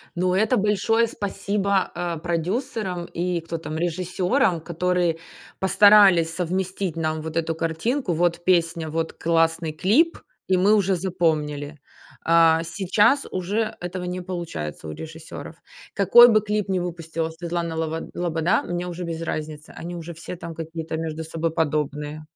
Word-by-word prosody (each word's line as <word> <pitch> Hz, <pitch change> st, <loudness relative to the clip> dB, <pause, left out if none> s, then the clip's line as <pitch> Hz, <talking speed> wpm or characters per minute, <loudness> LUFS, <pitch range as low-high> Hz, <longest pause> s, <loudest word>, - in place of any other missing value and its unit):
Ну, 180 Hz, +1 st, +1 dB
это 220 Hz, +5 st, +2 dB
большое 210 Hz, +3 st, +2 dB
спасибо, 200 Hz, -2 st, -1 dB
а, 170 Hz, -1 st, -2 dB
продюсерам 180 Hz, -, -2 dB
и 175 Hz, 0 st, -2 dB
кто 165 Hz, 0 st, -5 dB
там 160 Hz, -1 st, -6 dB
режиссёрам, 180 Hz, -, 0 dB
которые 175 Hz, 0 st, 0 dB, 0.4 s
постарались 190 Hz, -4 st, +6 dB
совместить 185 Hz, 0 st, -2 dB
нам 155 Hz, -1 st, -1 dB
вот 160 Hz, +1 st, -5 dB
эту 165 Hz, 0 st, 0 dB
картинку. 170 Hz, -, -1 dB
Вот 175 Hz, +1 st, 0 dB
песня, 170 Hz, -3 st, +1 dB
вот 165 Hz, +1 st, -2 dB
классный 165 Hz, -1 st, +1 dB
клип, 225 Hz, -, +2 dB, 0.3 s
и 185 Hz, -, +3 dB
мы 200 Hz, +4 st, +5 dB
уже 195 Hz, -2 st, +2 dB
запомнили. 155 Hz, -5 st, -1 dB, 0.5 s
А, 165 Hz, -1 st, +5 dB
сейчас 205 Hz, -, +2 dB
уже 205 Hz, +5 st, -1 dB
этого 180 Hz, +1 st, -5 dB
не 180 Hz, 0 st, -4 dB
получается 165 Hz, -, -5 dB
у -, -, -5 dB
режиссёров. 160 Hz, -, -9 dB, 0.4 s
Какой 240 Hz, +5 st, +8 dB
бы 215 Hz, -2 st, +4 dB
клип 210 Hz, -1 st, -1 dB
ни 190 Hz, -2 st, 0 dB
выпустила 165 Hz, -2 st, -3 dB
Светлана 170 Hz, 0 st, -4 dB
Лобо 160 Hz, 0 st, -3 dB
Лобода, 170 Hz, +2 st, 0 dB
мне 175 Hz, 0 st, -3 dB
уже 180 Hz, 0 st, -5 dB
без 165 Hz, -1 st, -4 dB
разницы, 155 Hz, -1 st, -5 dB
они 175 Hz, +1 st, -5 dB
уже 170 Hz, 0 st, -7 dB
все 170 Hz, +2 st, -8 dB
там 170 Hz, -1 st, -8 dB
какие-то 160 Hz, 0 st, -5 dB
между 160 Hz, 0 st, -4 dB
собой 165 Hz, 0 st, -2 dB
подобные. 150 Hz, -1 st, -2 dB
170 Hz, 145 wpm, -23 LUFS, 160-190 Hz, 0.5 s, Какой